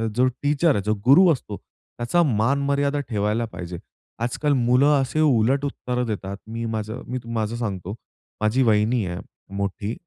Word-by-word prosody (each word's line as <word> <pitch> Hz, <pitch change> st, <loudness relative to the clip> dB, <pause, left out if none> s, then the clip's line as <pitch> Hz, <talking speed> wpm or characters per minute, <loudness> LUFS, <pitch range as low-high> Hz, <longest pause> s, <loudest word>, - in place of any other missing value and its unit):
जो 125 Hz, +2 st, +4 dB
टीचर 145 Hz, +5 st, +1 dB
आहे, 100 Hz, -, 0 dB
जो 105 Hz, +2 st, +1 dB
गुरु 170 Hz, +8 st, +7 dB
असतो 105 Hz, -6 st, -6 dB
त्याचा 120 Hz, +9 st, -3 dB
मान-मर्यादा 140 Hz, +4 st, +1 dB
ठेवायला 105 Hz, +1 st, 0 dB
पाहिजे. 90 Hz, -5 st, -7 dB, 0.5 s
आजकाल 145 Hz, +4 st, 0 dB
मुलं 125 Hz, +2 st, +3 dB
असे 135 Hz, +4 st, -2 dB
उलट 135 Hz, -1 st, +3 dB
उत्तर 125 Hz, -3 st, -3 dB
देतात. 100 Hz, -3 st, -4 dB
मी 115 Hz, +1 st, -4 dB
माझं 110 Hz, +2 st, -4 dB
मी 130 Hz, +1 st, -3 dB
माझं 110 Hz, 0 st, -1 dB
सांगतो, 100 Hz, -5 st, -4 dB, 0.5 s
माझी 110 Hz, +5 st, +2 dB
वहिनी 110 Hz, 0 st, +2 dB
आहे 90 Hz, 0 st, -4 dB, 0.4 s
मोठी, 100 Hz, +2 st, -3 dB
120 Hz, 150 wpm, -23 LUFS, 105-135 Hz, 0.5 s, गुरु